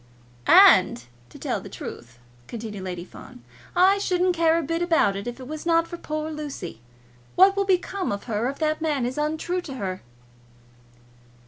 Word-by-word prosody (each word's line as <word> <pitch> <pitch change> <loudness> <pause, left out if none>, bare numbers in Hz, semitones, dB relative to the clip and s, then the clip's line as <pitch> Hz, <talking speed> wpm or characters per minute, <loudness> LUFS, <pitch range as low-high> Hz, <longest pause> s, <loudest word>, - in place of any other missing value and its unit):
"And 120 - +6 0.3
to - - -13
tell - - -3
the - - -10
truth," 120 +1 -9 0.3
continued 215 -4 -7
Lady 180 -2 -5
Fawn, 125 - -14 0.3
"I 385 +3 +5
shouldn't 365 -2 +1
care 330 -1 +3
a 335 - -1
bit 330 +3 -2
about 325 - +2
it 200 +3 -5
if 240 +2 -6
it 255 - -9
was 310 +1 -6
not 335 -1 +2
for 345 - -7
poor 310 -1 -4
Lucy. 285 - -7 0.5
What 385 +2 +6
will 395 0 +1
become 380 0 0
of 200 0 -4
her 225 +1 -1
if 275 - -6
that 310 0 -1
man 295 -6 0
is 255 +4 -3
untrue 315 +4 -1
to 280 -6 -8
her?" 190 -6 -4
305 Hz, 180 wpm, -24 LUFS, 220-345 Hz, 0.5 s, And